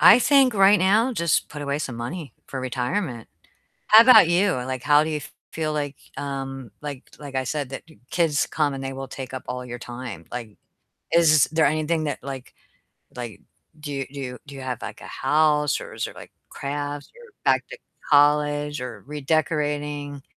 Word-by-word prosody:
I 225 - +9
think 265 -2 +4
right 200 +1 +6
now 215 +7 +3
just 170 -8 +1
put 150 - -8
away 140 0 -1
some 135 -5 -4
money 140 +6 -5
for 135 - -6
retirement. 125 - -2 0.6
How 215 +1 +10
about 235 -7 +8
you? 180 +3 +3
Like, 130 0 -3
how 145 +1 +5
do 155 - -3
you 150 -1 -2 0.3
feel 155 -1 -2
like, 145 -2 -2 0.2
um, 135 -3 -5
like 145 -3 -6 0.2
like 140 -2 -8
I 130 - +1
said, 140 +1 -3
that 135 - -7 0.3
kids 160 -4 +1
come 150 -3 0
and 135 0 -5
they 135 0 -4
will 135 0 -6
take 130 0 -8
up 130 - -5
all 125 0 -4
your 120 0 -6
time, 120 -9 -7
like, 115 -4 -7 0.6
is 155 -4 +6
there 160 0 +4
anything 155 +2 0
that 145 - -2
like 135 -2 -7 0.6
like 120 -6 -7 0.4
do 145 -3 -4
do 130 -3 -6
do 140 - -10
you 135 - -8
have 125 -3 -4
like - - -7
a - - -10
house 150 -1 +2
or - - -9
is - - -2
there - - -10
like - - -12 0.2
crafts 145 +1 -4
or 480 -1 -16
back - - +4
to - - -7 0.3
college 145 0 +3
or 120 -5 -7
redecorating? 145 -1 -1
145 Hz, 185 wpm, -24 LUFS, 130-155 Hz, 0.6 s, How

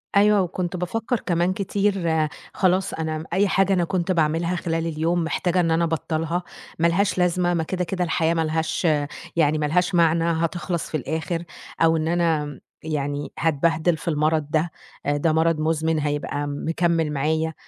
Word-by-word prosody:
أيوه، 205 0 +5
وكنت 180 0 -3
بافكّر 225 +7 -2
كمان 175 +1 0
كتير، 190 -5 0 0.3
خلاص، 185 0 +1
أنا 155 -1 -3
أي 200 +3 +3
حاجة 195 0 +2
أنا 180 -2 +2
كنت 180 +1 -1
باعملها 165 +1 +1
خلال 165 -1 -2
اليوم 165 +2 0
محتاجة 175 +2 0
إن 165 -2 +2
أنا 165 +1 +2
أبطّلها، 165 +1 -1 0.4
مالهاش 170 +5 +2
لازمة 180 0 +2
ما 165 -2 0
كده، 180 +2 -2
كده، 180 +1 -2
الحياة 165 -1 +1
مالهاش 160 +1 0 0.5
يعني 155 -2 +3
مالهاش 175 +5 +1
معنى، 165 -1 +4
هتخلص 165 0 -1
في 155 - -1
الآخر، 160 +4 -3 0.4
أو 165 0 +5
إن 155 0 -1
أنا 165 -3 +1
م 145 -3 -8 0.2
يعني 145 -2 -3
هاتبهدل 160 +1 +2
في - - -12
المرض 155 -1 +1
ده، 160 +1 +1 0.3
آآ، 145 0 +1
ده 155 +2 +1
مرض 160 0 +2
مزمن 160 0 +1
هيبقى 145 0 -2
مكمّل 165 +2 0
معايا، 160 +3 0
165 Hz, 160 wpm, -23 LUFS, 155-175 Hz, 0.5 s, أيوه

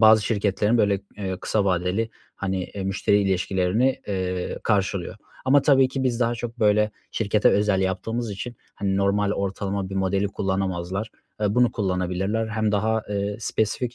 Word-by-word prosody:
bazı 110 -1 +7
şirketlerin 105 +1 +1
böyle, 100 -2 +2 0.2
eee, 95 -2 -3
kısa 105 -2 0
vadeli, 95 +4 0 0.3
hani, 95 -2 -2
eee, 95 0 -6
müşteri 95 +1 +2
ilişkilerini, 95 +6 +1
eee, 90 -2 -2
karşılıyor 95 -3 0 0.3
ama 135 +2 +5
tabii 135 -3 +5
ki 130 0 -3
biz 125 -2 0
daha 120 0 +2
çok 120 +1 -6
böyle 105 0 +3 0.2
şirkete 105 -1 +2
özel 105 -2 +2
yaptığımız 105 +5 -2
için, 110 +4 -6 0.2
hani, 95 -1 -1
normal 100 +1 +2
ortalama 100 -1 -2
bir - - -5
modeli 95 +1 +1
kullanamazlar. 95 +1 -2 0.3
Eee, 105 -1 +1
bunu 125 -2 +4
kullanabilirler; 95 +2 -1
hem 110 -1 0
daha, 110 +2 +1
eee, 100 0 -2
spesifik 115 +3 -1
100 Hz, 155 wpm, -24 LUFS, 95-110 Hz, 0.3 s, bazı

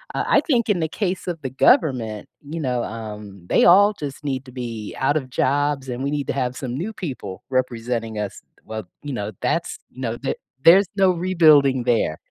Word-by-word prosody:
Uh, - - 0
I - - +4
think 240 -8 +1
in 200 -4 +2
the 160 -1 -1
case 185 -2 -3
of 170 -3 -3
the 130 - -3
government, 130 - +2 0.2
you 155 +3 -6
know, 125 -4 -1
um, 105 -4 -8
they - - +4
all 200 +4 +7
just 145 -6 -7
need 135 -2 -3
to 125 - -12
be 115 -4 -6
out 140 +3 +2
of 130 -3 -4
jobs 140 +1 0
and 125 +2 -4
we 140 - 0
need 145 -1 -2
to - - -1
have 130 -1 -2
some 125 -3 -4
new 180 +11 -3
people 125 - -6
representing 115 -3 -2
us. 105 -2 -5 0.2
Well, 110 -4 -6 0.2
you 145 - -5
know, 105 -3 -3
that's, - - -1
you 130 - -11
know, 115 -1 -2
the 135 - -1 0.3
there's 185 +3 +7
no 190 -1 +5
rebuilding 155 -7 +4
there. 115 -10 +1
130 Hz, 205 wpm, -22 LUFS, 115-160 Hz, 0.3 s, all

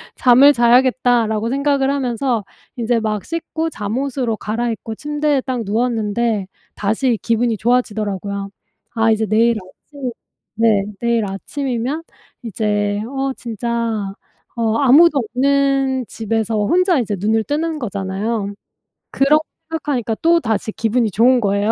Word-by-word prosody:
잠을 265 +3 +6
자야겠다.'라고 240 -2 +3
생각을 275 0 +1
하면서 250 -4 -1 0.3
이제 235 0 +1
막 215 -2 -2
씻고 330 0 -3
잠옷으로 240 +1 -2
갈아입고 225 0 -3
침대에 295 +1 0
딱 255 -3 -3
누웠는데 220 -1 0 0.3
다시 225 +3 0
기분이 230 0 +1
좋아지더라고요. 205 -4 -1 0.5
아 225 0 +3
이제 220 0 +1
내일 230 +2 +3
아침 255 +8 -8 0.4
네 220 -3 +3 0.2
내일 235 -2 +1
아침이면 255 +7 -3 0.4
이제 205 -1 -1
어 270 +1 -2
진짜 230 -3 -3 0.4
어 225 -1 +1
아무도 290 +3 +6
없는 270 +1 +1
집에서 225 +1 -2
혼자 365 - +3
이제 210 -3 -1
눈을 220 +3 +1
뜨는 315 +2 -1
거잖아요. 200 -1 -3 0.6
그렇게 295 +3 +3 0.3
생각하니까 275 -8 -2
또다시 285 -11 +1
기분이 225 0 +1
좋은 245 +5 +4
거예요. 200 +1 +1
235 Hz, 295 characters per minute, -19 LUFS, 215-270 Hz, 0.6 s, 잠을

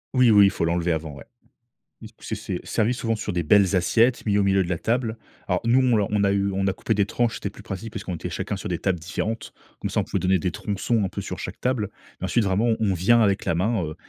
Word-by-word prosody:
Oui, 125 -2 +5
oui, 100 -2 +7
il 100 - +5
faut 95 - -3
l'enlever 85 +1 +1
avant, 80 -2 -3
ouais, 70 - -11 0.8
du - - -9
coup, - - -23
c'est - - -5
c'est - - -4
servi 115 +3 0
souvent 115 -2 -1
sur 105 -1 -4
des 85 -1 -1
belles 100 +2 +4
assiettes 115 +7 +2
mis 105 -2 +2
au 100 - +3
milieu 95 0 +3
de 85 - -6
la 85 -3 -1
table 115 -1 -1 0.3
alors, 90 -1 0
nous, 120 +3 +4
on 130 -3 +3
l'a 105 -2 +2
on 105 -1 +1
a 100 - +3
eu 100 0 +1
on 95 0 -1
a 95 - +1
coupé 110 - -1
des 100 -1 +2
tranches, 120 +2 0
c'était 100 - -4
plus - - -13
pratique 100 +3 -7
parce 110 -2 -5
qu'on 90 -4 -4
était - - -6
chacun 105 - -3
sur 100 - -6
des 90 -4 -2
tables 95 -2 0
différentes 105 +6 -4 0.3
comme - - -4
ça, - - +1
on - - +1
pouvait - - -2
donner 95 0 +2
des 90 - -1
tronçons 105 +4 -1
un 95 - -1
peu - - -5
sur - - -6
chaque - - -7
table 125 -5 0 0.3
mais - - -3
ensuite 115 -3 +1
vraiment, 100 +4 +1
on 115 -2 +2
on 100 -3 +1
vient 115 +7 +4
avec 100 -2 +1
la - - +1
main, 95 +3 0
heu, 75 0 -6
100 Hz, 290 wpm, -24 LUFS, 90-115 Hz, 0.8 s, oui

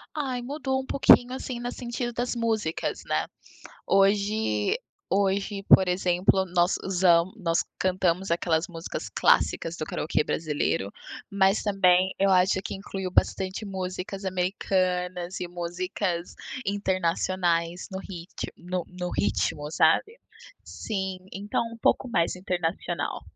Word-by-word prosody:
Ai, 260 -5 -2
mudou 265 0 -2
um - - -10
pouquinho, 255 -2 +5
assim, 255 -2 -5
no 245 +1 -3
sentido 240 -1 -4
das 245 +1 -2
músicas, 220 -8 -1
né. - - 0 0.6
Hoje 200 - +2 0.3
hoje, 195 0 0
por 190 -2 +7
exemplo, 180 +1 +2
nós 175 +1 +2
usam 180 -1 +3
nós 170 -6 0 0.2
cantamos 185 0 +1
aquelas 170 -1 +1
músicas 165 -2 -6
clássicas 165 +1 +2
do 155 - -3
karaokê 150 +1 0
brasileiro, 150 -11 -1 0.4
mas 195 +1 +2
também 190 -2 +3
eu 195 0 +3
acho 185 0 +4
que - - -4
incluiu 195 -1 -5
bastante 190 +3 0
músicas 190 +1 -5
americanas 180 -1 -1
e 180 - -3
músicas 175 +1 -3 0.3
internacionais 180 -3 0
no 190 - -4
rit 180 -3 -7
no 180 0 -4
no 180 -1 -5
ritmo, 125 +8 0
sabe. 430 - +3 0.4
Sim, 190 -3 -4
então 205 +2 -1
um - - -8
pouco 255 - +2
mais 170 -6 +1
internacional. 175 -3 -2
185 Hz, 125 wpm, -26 LUFS, 175-200 Hz, 0.6 s, por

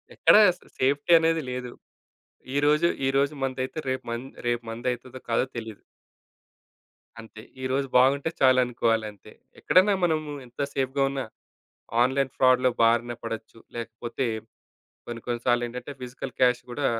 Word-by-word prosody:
ఎక్కడ - - +5 0.2
అసలా 175 - -16
సేఫ్టీ 140 +5 +1
అనేది 165 0 +1
లేదు. 125 -1 -5 0.8
ఈరోజు, 150 +3 +3 0.2
ఈరోజు 140 +2 +1
మందైతే 130 +3 -3
రేపు 130 0 -2
మం 115 +1 -3 0.2
రేపు 120 0 0
మందైతదో 125 +2 -4
కాదో 115 +2 +2
తెలీదు. 110 -3 -7 1.4
అంతే. 110 -1 -11 0.2
ఈరోజు 135 +1 -1
బాగుంటే 135 +4 +3
చాలు 130 -1 +5
అనుకోవాలి 115 -2 0
అంతే. 105 - -17 0.3
ఎక్కడైనా 195 +3 +4
మనము 155 -3 +1 0.2
ఎంత 120 0 -21
సేఫ్‌గా 135 +1 0
ఉన్న, 135 -1 -3 0.8
ఆన్‌లైన్ 135 +1 0
ఫ్రాడ్‌లో 130 0 +4
బారిన 120 +1 +3
పడొచ్చు. 115 0 -7 0.2
లేకపోతే 115 +2 -4 0.8
కొన్ని, 120 -1 -6
కొన్ని 120 -1 -2
సార్లేంటంటే 120 +2 -1
ఫిజికల్ 125 +1 -7
క్యాష్ 125 -1 +3
కూడా, 135 +3 -1
130 Hz, 125 wpm, -26 LUFS, 120-135 Hz, 1.4 s, ఎక్కడ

